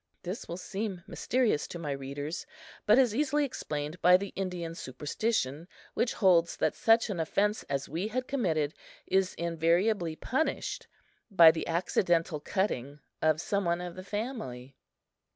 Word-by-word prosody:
This 185 Hz, +5 st, -5 dB
will 170 Hz, -, -5 dB
seem 195 Hz, -1 st, -4 dB
mysterious 245 Hz, -, 0 dB
to -, -, -7 dB
my 155 Hz, -4 st, -4 dB
readers, 140 Hz, -, -5 dB, 0.4 s
but 215 Hz, +3 st, +7 dB
is 250 Hz, -5 st, +4 dB
easily 295 Hz, +3 st, +1 dB
explained 150 Hz, -, -5 dB
by 180 Hz, +1 st, +7 dB
the 200 Hz, +1 st, -5 dB
Indian 180 Hz, -3 st, -4 dB
superstition, 150 Hz, -, -2 dB, 0.3 s
which 235 Hz, -, 0 dB
holds 175 Hz, -4 st, +3 dB
that -, -, +1 dB
such 225 Hz, 0 st, +3 dB
an 180 Hz, -, -3 dB
offense 205 Hz, +6 st, +1 dB
as 140 Hz, 0 st, -2 dB
we 170 Hz, +8 st, -2 dB
had 255 Hz, +3 st, -3 dB
committed 160 Hz, -, 0 dB, 0.3 s
is 190 Hz, 0 st, +1 dB
invariably 170 Hz, +2 st, +1 dB
punished 265 Hz, -, -2 dB, 0.4 s
by 170 Hz, -6 st, +8 dB
the 160 Hz, -, -4 dB
accidental 170 Hz, -2 st, +1 dB
cutting 145 Hz, -6 st, -2 dB, 0.2 s
of 155 Hz, -1 st, +3 dB
some 200 Hz, +4 st, -1 dB
one 170 Hz, 0 st, +1 dB
of 180 Hz, -1 st, -5 dB
the 185 Hz, -, -8 dB
family. 195 Hz, -, -5 dB
175 Hz, 150 wpm, -30 LUFS, 155-210 Hz, 0.4 s, by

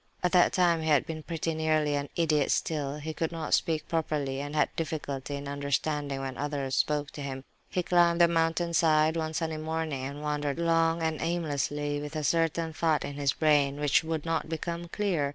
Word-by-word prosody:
At 180 Hz, -, +2 dB
that 180 Hz, -2 st, +5 dB
time 175 Hz, -3 st, +3 dB
he 160 Hz, -, -3 dB
had 145 Hz, -2 st, +4 dB
been 160 Hz, -1 st, -5 dB
pretty 165 Hz, 0 st, -3 dB
nearly 155 Hz, -1 st, +1 dB
an 140 Hz, -1 st, -2 dB
idiot 155 Hz, -4 st, +2 dB
still; 145 Hz, -3 st, -1 dB
he 155 Hz, +1 st, -5 dB
could 165 Hz, +1 st, -2 dB
not 165 Hz, -2 st, -3 dB
speak 160 Hz, -2 st, +1 dB
properly, 150 Hz, -4 st, -1 dB
and 145 Hz, +1 st, -5 dB
had 150 Hz, -, +1 dB
difficulty 145 Hz, -3 st, -3 dB
in 140 Hz, 0 st, -6 dB
understanding 140 Hz, 0 st, -1 dB
when 135 Hz, -1 st, -5 dB
others 140 Hz, -2 st, -2 dB
spoke 150 Hz, -1 st, 0 dB
to 145 Hz, -, -8 dB
him. 135 Hz, -1 st, -5 dB, 0.3 s
He 180 Hz, -, -1 dB
climbed 175 Hz, -1 st, +3 dB
the 170 Hz, -, +7 dB
mountain 165 Hz, 0 st, +1 dB
side, 155 Hz, -1 st, +4 dB
one 160 Hz, -1 st, -2 dB
sunny 160 Hz, -1 st, -2 dB
morning, 155 Hz, -3 st, -3 dB
and 140 Hz, +2 st, -6 dB
wandered 150 Hz, -1 st, -1 dB
long 165 Hz, 0 st, +2 dB
and 160 Hz, -1 st, -1 dB
aimlessly 145 Hz, -3 st, -1 dB
with 150 Hz, +2 st, -7 dB
a 155 Hz, -, -2 dB
certain 165 Hz, +2 st, +1 dB
thought 160 Hz, -1 st, +1 dB
in 140 Hz, -, -5 dB
his 140 Hz, -1 st, 0 dB
brain, 145 Hz, -2 st, +2 dB
which 150 Hz, +2 st, +3 dB
would 160 Hz, -1 st, -3 dB
not 165 Hz, -1 st, -1 dB
become 170 Hz, +1 st, -4 dB
clear. 170 Hz, -7 st, 0 dB
155 Hz, 200 wpm, -29 LUFS, 145-165 Hz, 0.3 s, the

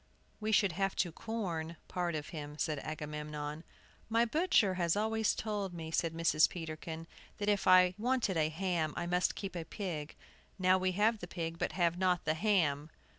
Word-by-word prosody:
"We 215 Hz, 0 st, -1 dB
should 200 Hz, -3 st, +4 dB
have 195 Hz, +3 st, -1 dB
to 175 Hz, -, 0 dB
'corn' 170 Hz, -6 st, -4 dB
part 175 Hz, -2 st, -2 dB
of 150 Hz, -1 st, -4 dB
him," 150 Hz, -2 st, -7 dB
said 155 Hz, -2 st, -1 dB
Agamemnon. 150 Hz, 0 st, -5 dB, 0.5 s
"My 230 Hz, +1 st, +3 dB
butcher 270 Hz, -, +3 dB
has 175 Hz, -1 st, +1 dB
always 220 Hz, +1 st, +1 dB
told 205 Hz, -4 st, -3 dB
me," 160 Hz, -1 st, -6 dB
said 165 Hz, 0 st, +1 dB
Mrs. 165 Hz, -2 st, +4 dB
Peterkin, 160 Hz, -1 st, -6 dB, 0.3 s
"that 205 Hz, 0 st, -1 dB
if 205 Hz, -1 st, +1 dB
I 185 Hz, -1 st, +7 dB
wanted 245 Hz, -4 st, +1 dB
a 155 Hz, -1 st, +2 dB
ham 165 Hz, -2 st, -1 dB
I -, -, -1 dB
must 180 Hz, +1 st, +1 dB
keep 195 Hz, -2 st, -5 dB
a 170 Hz, -, -3 dB
pig. 160 Hz, -5 st, -5 dB, 0.4 s
Now 185 Hz, 0 st, +4 dB
we 185 Hz, 0 st, +1 dB
have 215 Hz, +3 st, +2 dB
the 175 Hz, -, -7 dB
pig, 165 Hz, -1 st, -4 dB
but -, -, -1 dB
have 175 Hz, -1 st, +1 dB
not 180 Hz, -2 st, +2 dB
the 155 Hz, -, +2 dB
ham!" 160 Hz, -6 st, +1 dB
175 Hz, 180 wpm, -33 LUFS, 160-200 Hz, 0.5 s, I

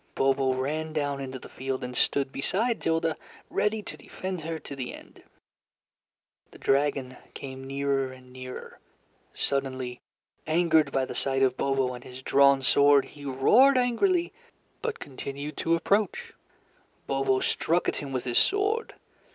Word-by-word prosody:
Bobo 135 Hz, -1 st, +2 dB
ran 155 Hz, +4 st, -2 dB
down 145 Hz, -2 st, -1 dB
into 130 Hz, -1 st, -5 dB
the -, -, -11 dB
field 130 Hz, 0 st, -4 dB
and 125 Hz, 0 st, -5 dB
stood 135 Hz, +1 st, +1 dB
beside 220 Hz, -, 0 dB
Tilda, 165 Hz, 0 st, +1 dB, 0.3 s
ready 210 Hz, 0 st, 0 dB
to -, -, -7 dB
defend 185 Hz, -2 st, -6 dB
her 165 Hz, +1 st, -3 dB
to 140 Hz, -, -8 dB
the 130 Hz, -2 st, -5 dB
end. -, -, -15 dB, 1.3 s
The -, -, -15 dB
dragon 135 Hz, -2 st, +1 dB, 0.2 s
came 135 Hz, -1 st, -7 dB
nearer 135 Hz, -1 st, 0 dB
and 130 Hz, -1 st, -14 dB
nearer. 130 Hz, 0 st, -8 dB, 0.6 s
Suddenly, 130 Hz, -3 st, -2 dB, 0.5 s
angered 160 Hz, -3 st, +3 dB
by 135 Hz, -1 st, +1 dB
the -, -, -6 dB
sight 135 Hz, 0 st, +1 dB
of 130 Hz, -1 st, +3 dB
Bobo 135 Hz, -2 st, 0 dB
and 125 Hz, 0 st, -9 dB
his 130 Hz, +1 st, -10 dB
drawn 140 Hz, 0 st, +5 dB
sword, 140 Hz, 0 st, +5 dB
he 145 Hz, -1 st, -11 dB
roared 220 Hz, -, +5 dB
angrily, 340 Hz, -, +2 dB, 0.5 s
but 465 Hz, -1 st, -2 dB
continued 140 Hz, +2 st, -6 dB
to 165 Hz, 0 st, +2 dB
approach. 200 Hz, +3 st, 0 dB, 0.7 s
Bobo 135 Hz, -1 st, +1 dB
struck 170 Hz, +6 st, +1 dB
at -, -, 0 dB
him 140 Hz, -2 st, -5 dB
with 130 Hz, -2 st, -2 dB
his 120 Hz, -2 st, +2 dB
sword. 415 Hz, +3 st, +1 dB
140 Hz, 150 wpm, -27 LUFS, 130-165 Hz, 1.3 s, drawn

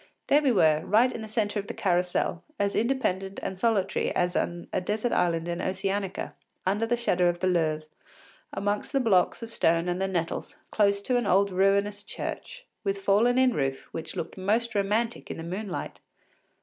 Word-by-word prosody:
There 290 Hz, -, +4 dB
we 275 Hz, -3 st, +3 dB
were, 155 Hz, -7 st, +4 dB
right 230 Hz, +7 st, +4 dB
in 230 Hz, -, -6 dB
the 220 Hz, -, -6 dB
centre 210 Hz, -1 st, -1 dB
of 200 Hz, -, -6 dB
the -, -, -6 dB
Carrousel, 180 Hz, -2 st, 0 dB
as 200 Hz, 0 st, 0 dB
independent 195 Hz, -6 st, 0 dB
and 190 Hz, -, -3 dB
solitary 195 Hz, -1 st, +1 dB
as 180 Hz, 0 st, +1 dB
on 175 Hz, 0 st, -2 dB
a -, -, +1 dB
desert 215 Hz, +5 st, -1 dB
island 170 Hz, -1 st, +1 dB
in 170 Hz, 0 st, -2 dB
Oceanica, 195 Hz, 0 st, -2 dB, 0.3 s
under 205 Hz, +4 st, +1 dB
the 240 Hz, +1 st, +1 dB
shadow 180 Hz, -7 st, +2 dB
of 175 Hz, 0 st, -2 dB
the 185 Hz, -, -1 dB
Louvre, 160 Hz, -4 st, +1 dB, 0.7 s
among 205 Hz, +1 st, -1 dB
the 275 Hz, -, +2 dB
blocks 215 Hz, -3 st, +2 dB
of 230 Hz, 0 st, -8 dB
stone 165 Hz, +1 st, +2 dB
and 180 Hz, +1 st, -1 dB
the 195 Hz, -, +1 dB
nettles, 170 Hz, -3 st, -3 dB
close 200 Hz, -1 st, +2 dB
to 250 Hz, +2 st, +1 dB
an 240 Hz, -4 st, 0 dB
old 200 Hz, +1 st, +3 dB
ruinous 200 Hz, +2 st, +2 dB
church, -, -, -6 dB, 0.2 s
with 195 Hz, -1 st, 0 dB
fallen 210 Hz, +5 st, +3 dB
in 260 Hz, -1 st, +4 dB
roof 135 Hz, -4 st, -2 dB
which 165 Hz, -, -5 dB
looked 170 Hz, -, -5 dB
most 225 Hz, +5 st, 0 dB
romantic 215 Hz, +3 st, 0 dB
in -, -, -5 dB
the 165 Hz, -, -6 dB
moonlight. 185 Hz, +3 st, -5 dB
195 Hz, 190 wpm, -27 LUFS, 180-220 Hz, 0.7 s, There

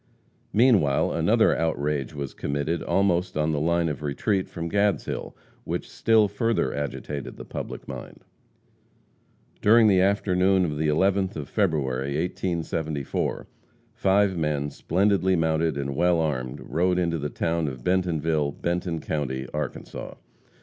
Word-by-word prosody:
Meanwhile 105 Hz, -, +4 dB
another -, -, +3 dB
outrage 75 Hz, -4 st, -1 dB
was 70 Hz, -2 st, -5 dB
committed 70 Hz, +4 st, -2 dB
almost 95 Hz, -4 st, +1 dB
on 75 Hz, +1 st, +1 dB
the 75 Hz, -, 0 dB
line 85 Hz, +2 st, +1 dB
of 75 Hz, -3 st, -3 dB
retreat 95 Hz, +7 st, -1 dB
from 85 Hz, -1 st, -5 dB
Gadshill, 100 Hz, +2 st, -1 dB, 0.3 s
which -, -, -3 dB
still 110 Hz, -2 st, +3 dB
further 115 Hz, +3 st, 0 dB
agitated 70 Hz, 0 st, -5 dB
the -, -, -8 dB
public -, -, -7 dB
mind. -, -, -9 dB, 1.4 s
During 110 Hz, +1 st, +6 dB
the 95 Hz, -3 st, +5 dB
afternoon 95 Hz, -1 st, +3 dB
of 75 Hz, -3 st, -3 dB
the 80 Hz, -, +1 dB
11th 95 Hz, +5 st, +2 dB
of -, -, -5 dB
February, 70 Hz, -, 0 dB
1874, 80 Hz, -4 st, -2 dB, 0.5 s
five 100 Hz, 0 st, +2 dB
men, 75 Hz, -3 st, -1 dB
splendidly 95 Hz, +1 st, +1 dB
mounted 80 Hz, -2 st, +1 dB
and 70 Hz, -1 st, -3 dB
well 90 Hz, +3 st, +3 dB
armed, 65 Hz, -6 st, -2 dB
rode 90 Hz, +2 st, 0 dB
into 85 Hz, -2 st, 0 dB
the 75 Hz, +1 st, -3 dB
town 80 Hz, 0 st, -1 dB
of 65 Hz, -3 st, -6 dB
Bentonville, 80 Hz, -5 st, +1 dB
Benton 85 Hz, 0 st, -2 dB
county, 65 Hz, -4 st, -3 dB
Arkansas. 75 Hz, -1 st, -5 dB
80 Hz, 130 wpm, -25 LUFS, 75-95 Hz, 1.4 s, During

